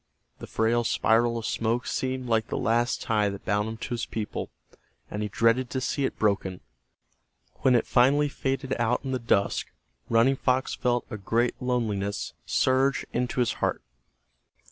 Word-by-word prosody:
That - - -8
frail 115 +2 +1
spiral 115 +1 +2
of 115 - -4
smoke 115 +2 0
seemed 130 0 -2
like 115 -1 +1
the - - -3
last 120 +1 +1
tie 105 -4 +1
that 100 0 -8
bound 105 +2 0
him 110 - -6
to - - -6
his 120 - -3
people, 110 -2 -4 0.6
and 105 - -3
he 105 - -1
dreaded 115 +4 +2
to 130 - -2
see 135 +2 -1
it - - -3
broken. 100 -3 0 1.0
When 130 -2 +3
it 120 - +2
finally 140 +4 +4
faded 135 -1 -2
out 120 +2 +1
in 135 - -2
the 130 - -1
dusk 105 -4 +1 0.4
Running 120 +4 +4
Fox 130 0 +1
felt 120 -2 0
a 110 - -4
great 115 +4 +1
loneliness 110 -5 -1
surge 130 +1 +2
into 125 +1 0
his 120 - +1
heart. - - 0
120 Hz, 165 wpm, -27 LUFS, 110-130 Hz, 1.0 s, finally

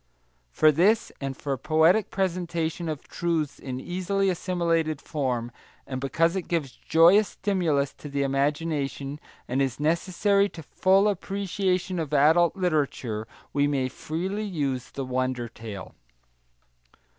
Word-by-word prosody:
For 155 - +5
this, 195 +9 +3
and 135 -1 -4
for 140 -2 -2
poetic 160 +8 +3
presentation 170 -3 -2
of 155 -3 -5
truths 165 -4 -2
in 130 -2 -5
easily 185 +4 0
assimilated 165 -4 0
form, 125 -6 -2 0.3
and 130 -1 -5
because 165 +6 +1
it 190 - -3
gives 160 -6 -1
joyous 175 +10 +5
stimulus 165 -8 0
to 145 - -8
the 140 0 0
imagination, 140 0 -1 0.3
and 130 +3 0
is 135 -1 -1
necessary 190 +6 +2
to 165 - -10
full 190 +6 +3
appreciation 195 -2 -1
of 155 -2 -2
adult 160 +5 +5
literature, 140 - -1 0.3
we 145 0 +3
may 135 -3 0
freely 185 +10 -3
use 140 -9 -2
the 135 - -5
wonder 130 -1 -1
tale. 110 -4 -9
160 Hz, 130 wpm, -26 LUFS, 135-180 Hz, 0.3 s, For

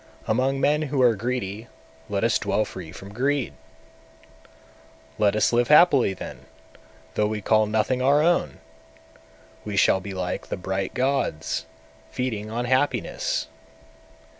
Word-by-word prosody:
among 130 +5 +1
men 150 +3 +2
who 145 -2 -2
are 120 -2 +5
greedy 110 -1 -4 0.4
let - - -1
us - - +2
dwell 110 +1 0
free 85 -4 -9
from 95 +3 -11
greed! 135 +3 0 1.7
200. - - -24
Let 105 -1 +3
us 110 - +2
live 120 0 +3
happily 145 - +5
then, 65 - -9 0.7
though 105 - +1
we 105 0 -3
call 110 +1 +2
nothing 110 +4 0
our 140 +3 +4
own! 175 +1 +1 1.1
We 105 -2 -4
shall 95 - +4
be 95 0 -7
like 90 -1 -3
the - - -4
bright 95 +1 -3
gods, 130 - -1 0.4
feeding 110 - -3
on 120 +2 -2
happiness! 130 - 0
110 Hz, 140 wpm, -24 LUFS, 100-130 Hz, 1.7 s, are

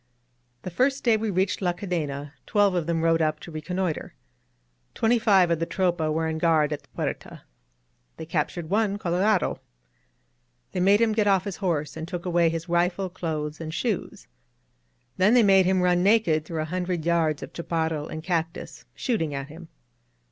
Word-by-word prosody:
The 185 - -5
first 270 +9 +1
day 235 -3 +4
we 220 0 -1
reached 190 +1 0
La 180 -2 +1
Cadena, 150 -7 -4
twelve 205 -2 +3
of 175 -3 -1
them 165 -1 0
rode 165 0 +3
up 155 -1 0
to 170 - -10
reconnoiter. 165 - -3 0.8
Twenty 230 +1 +2
five 195 -6 +4
of 165 - +1
the 165 - -1
Tropa 175 -4 0
were 160 +1 0
on 160 0 -3
guard 155 -3 +2
at 150 - -5
the - - -27
Fuerta. - - -5 0.7
They - - -7
captured 170 -1 -3
one 205 -1 +1
Colorado. 185 +2 +1 1.1
They - - -3
made 200 +4 +4
him 225 -1 +3
get 215 -1 +1
off 195 -2 +3
his 200 -2 -5
horse, 155 -6 -2
and 160 0 -6
took 175 -1 -6
away 170 -2 +3
his 165 +1 -4
rifle, 175 +2 0
clothes 155 -3 -4
and 160 -1 -5
shoes. 200 +5 -3 0.9
Then 205 +6 +4
they 240 - +6
made 195 -2 +5
him 185 -1 +2
run 180 -1 +3
naked 190 -6 +3
through 160 -1 -3
a 155 +3 -7
hundred 180 -3 -2
yards 165 -3 +1
of - - -8
chaparral 160 -2 -2
and 155 0 -7
cactus, 165 -2 -3
shooting 165 - -1
at 140 +1 -5
him. 165 +2 -11
175 Hz, 180 wpm, -25 LUFS, 160-195 Hz, 1.1 s, they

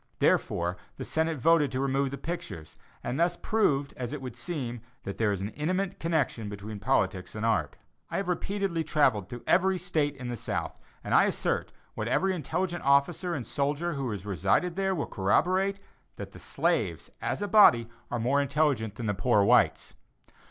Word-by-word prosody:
Therefore, 85 +1 +1 0.2
the - - -5
Senate 160 0 0
voted 150 +1 +3
to 130 - -1
remove 135 0 +1
the 140 - -5
pictures, 160 - -6 0.3
and 135 - -2
thus 175 +1 +2
proved 145 -11 +1
as 125 -1 -4
it 150 - -4
would 125 -3 -7
seem, 120 -3 -4 0.2
that 100 - -6
there 110 -2 +2
is 100 -2 -2
an 100 - -2
intimate 185 - -2
connection 155 -10 -1
between 105 +1 -7
politics 95 -1 0
and 110 +1 -2
art. 115 - +1 0.3
I - - -2
have 195 - -2
repeatedly 185 -1 -1
travelled 135 -11 +2
through 120 -1 -8
every 190 +1 +3
State 155 -5 0
in 125 -1 -6
the 120 - -2
South, - - -3 0.2
and - - -3
I - - +6
assert, - - -1 0.2
what 110 - -3
every 190 +10 +2
intelligent 175 +1 -2
officer 140 +6 +2
and 130 -5 -4
soldier 145 +5 -1
who 135 -3 -3
has 105 -3 -5
resided 105 - +1
there 190 0 0
will 150 - -1
corroborate, 185 - +1 0.4
that - - -7
the - - -12
slaves, - - -1
as - - -2
a - - -1
body, 150 - +6 0.2
are 120 - -2
more 130 +5 +2
intelligent 140 -7 +1
than 115 - -5
the 105 - +1
poor 105 +2 +3
whites. 120 +3 +3
140 Hz, 185 wpm, -28 LUFS, 115-170 Hz, 0.4 s, I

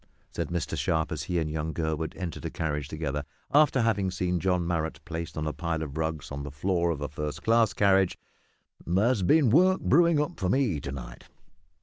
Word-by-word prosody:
"H'm!" - - -35 0.2
said - - -3
Mr 85 -2 -2
Sharp, 80 -1 0
as - - -3
he 90 - -2
and 80 -2 0
young 80 +1 -3
Gurwood 80 -1 -2
entered 90 -4 -5
a - - -1
carriage 75 -3 -3
together, 75 -2 -3 0.3
after 145 -3 +5
having 100 -4 +1
seen 90 -1 -1
John 90 -1 +1
Marrot 80 -2 -2
placed 85 -1 -5
on 75 - -2
a 75 - -2
pile 80 -2 -2
of 70 -2 -7
rugs 80 -2 -3
on 70 0 -4
the 70 - -5
floor 85 +4 0
of 80 -4 -2
a 75 - -2
first 75 +2 -5
class 115 -1 +4
carriage; 95 -2 +3 0.7
"there's 100 +6 +2
been 135 - +4
work 185 +7 +5
brewin' 170 -2 +4
up 150 +4 -2
for 90 - 0
me 110 - +1
to 70 - -6
night." - - -8
85 Hz, 210 wpm, -28 LUFS, 75-100 Hz, 0.7 s, after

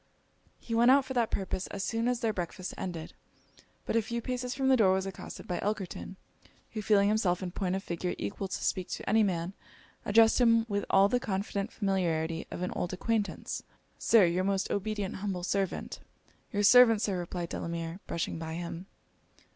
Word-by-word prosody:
He 230 - -6
went 235 +2 +5
out 270 +1 +6
for 265 - -5
that 235 -3 +1
purpose 190 -1 -3
as 195 - -5
soon 225 +3 -1
as 245 -1 0
their 225 -2 +1
breakfast 180 0 -4
ended; 170 -4 -5 0.7
but - - -2
a 230 - +4
few 235 +2 -3
paces 250 +1 -3
from 265 0 0
the 265 - +6
door 200 -6 +4
was 190 0 0
accosted 195 - -8
by 180 - -2
Elkerton, 195 -2 -3 0.6
who 215 - -4
feeling 205 -1 +4
himself 200 -4 +1
in 180 - -4
point 185 0 -1
of 195 - -3
figure 175 0 -3
equal 100 - -4
to 190 - -4
speak 185 -1 -1
to - - -5
any 220 +1 +4
man, 180 -3 0 0.5
addressed 225 +3 +5
him 230 -1 +5
with 200 -2 -1
all 195 +1 +6
the 245 +4 +1
confident 200 -1 -2
familiarity 170 -5 -1
of 180 - -5
an 180 - -2
old 180 - -3
acquaintance. 215 +2 -2 0.4
'Sir, 225 -5 +6
your 175 +2 +1
most 195 0 0
obedient 205 -1 -2
humble 190 -2 -3
servant.' 195 0 -2 0.5
'Your 205 0 0
servant, 230 0 +7
Sir;' 195 -3 0
replied 175 0 -4
Delamere, 170 +1 -4
brushing 165 -1 -3
by 160 0 -5
him. 175 +1 -6
195 Hz, 185 wpm, -30 LUFS, 180-225 Hz, 0.7 s, servant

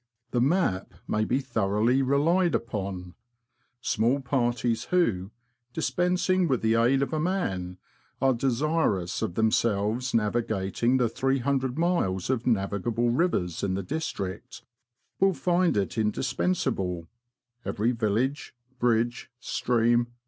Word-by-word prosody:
The 120 - +1
Map 135 - +1
may 110 0 0
be 130 - +1
thoroughly 115 0 +1
relied 155 +6 +2
upon. 95 -5 -4 0.7
Small 115 +6 +1
parties 120 -3 0
who, 110 - +1 0.4
dispensing 180 +8 +1
with 130 -6 0
the 110 0 +3
aid 120 +4 +3
of 140 - -4
a 155 - 0
man, 95 - -2 0.4
are 135 0 +3
desirous 125 - 0
of 85 - -2
themselves 110 +2 +1
navigating 110 +1 +1
the 125 -2 +2
300 135 +1 0
miles 135 - 0
of 125 -2 -2
navigable 115 +2 0
rivers 120 - 0
in 95 -2 -1
th^ 95 -1 -4
district, 115 - -5 0.6
will 195 0 +4
find 175 - +1
it 100 - +1
indispens 125 +11 0
able, 90 -8 -2 0.6
every 110 +4 0
village, 120 +6 -1 0.2
bridge, 120 0 +1
stream. 120 0 +1
120 Hz, 120 wpm, -27 LUFS, 105-135 Hz, 0.7 s, will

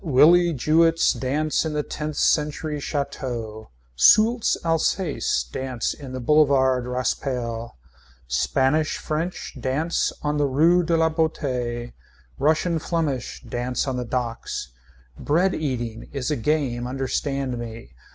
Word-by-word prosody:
Willie 170 +3 +5
Jewetts 165 +4 +3
dance 150 +4 0
in 160 -1 -3
the 150 0 -1
tenth 150 0 -5
century 150 0 +1
chateau. 120 -7 -4 0.3
Soultz 220 - +5
Alsace 165 - 0
dance 130 - -2
on 135 -2 -8
the 130 - -5
Boulevard 130 -2 +3
Raspail 125 -2 -2 0.5
Spanish 135 - +1
French 165 +4 -4
dance 145 +7 0
on 150 0 0
the 145 -1 +2
rue 165 +7 +4
de 165 -1 +1
la 160 0 +3
Boetie 125 -7 -2 0.5
Russian 160 +3 +2
Flemish 155 -7 -2
dance 125 +3 -2
on 130 - -1
the 125 - -2
docks. 115 - -4 0.5
Bread 175 +6 +2
eating 120 -6 -4
is 140 0 -3
a - - +1
game 125 -2 -1
understand 135 0 -2
me. 115 - -8
140 Hz, 120 wpm, -23 LUFS, 125-155 Hz, 0.5 s, Willie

